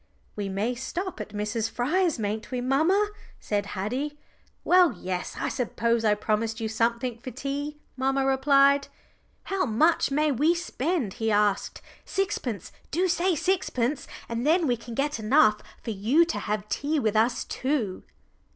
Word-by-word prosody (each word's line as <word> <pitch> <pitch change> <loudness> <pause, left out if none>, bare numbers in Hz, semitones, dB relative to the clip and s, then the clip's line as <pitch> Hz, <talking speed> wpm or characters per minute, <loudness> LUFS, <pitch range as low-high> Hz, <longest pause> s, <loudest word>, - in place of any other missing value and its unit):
"We 205 -2 -3
may 205 +6 -1
stop 345 - -4
at 210 - -7
Miss 210 +2 -2
Fryer's, 320 +8 +1
mayn't 215 0 -3
we, 255 - -2
mamma?" 320 +12 +2 0.3
said 205 -1 -2
Haddie. 260 +10 -2 0.5
"Well, 360 -2 +5
yes, 180 -1 -4
I - - -1
suppose 235 -2 0
I 210 -1 +4
promised 220 +2 -1
you 225 - -2
something 235 +2 -1
for 255 - -7
tea," 280 +3 -4 0.2
mamma 270 +1 +1
replied. 275 +1 +4 0.6
"How 385 -1 -1
much 300 +10 +3
may 300 +2 +2
we 300 +7 +3
spend?" 330 - -2
he 225 - +2
asked. 205 -1 +1 0.2
"Sixpence 270 - -2 0.2
do 360 +4 +1
say 360 +1 +2
sixpence, 295 -7 0 0.2
and 230 0 -3
then 325 +4 +3
we 245 -4 +2
can 235 0 -9
get 285 -1 -1
enough 215 -2 +4 0.2
for 230 - -3
you 230 +12 +3
to 330 - -3
have 210 0 -3
tea 290 +8 0
with 220 -4 0
us 225 +3 +2
too." 255 -9 -2
255 Hz, 155 wpm, -26 LUFS, 220-300 Hz, 0.6 s, Well